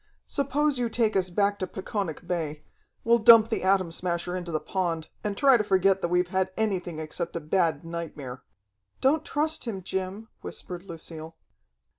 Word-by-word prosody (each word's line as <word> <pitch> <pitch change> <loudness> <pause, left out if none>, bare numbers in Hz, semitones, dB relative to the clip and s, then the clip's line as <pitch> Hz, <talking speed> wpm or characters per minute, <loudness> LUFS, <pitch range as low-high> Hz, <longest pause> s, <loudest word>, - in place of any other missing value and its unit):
"Suppose 285 0 0
you 240 -1 0
take 225 -2 +1
us 185 -1 +2
back 200 +3 +1
to 185 - -2
Peconic 190 -3 -4
Bay. 160 -4 -3 0.4
We'll 235 +1 +4
dump 230 0 +8
the 225 - 0
Atom 190 -2 +2
Smasher 175 +1 -2
into 175 -2 -4
the 155 - 0
pond, 170 -4 -2
and 205 -1 -2
try 270 -3 +6
to 210 - 0
forget 195 -1 +3
that 175 - +1
we've 180 +1 +1
had 190 0 +1
anything 185 -6 -1
except 160 +2 -4
a - - -1
bad 165 -1 0
nightmare." 155 -6 -6 0.6
"Don't 295 +4 +3
trust 310 0 0
him, 195 -6 -4
Jim," 190 +4 -4
whispered 175 -1 -6
Lucille. 165 -2 -8
185 Hz, 170 wpm, -27 LUFS, 170-215 Hz, 0.6 s, dump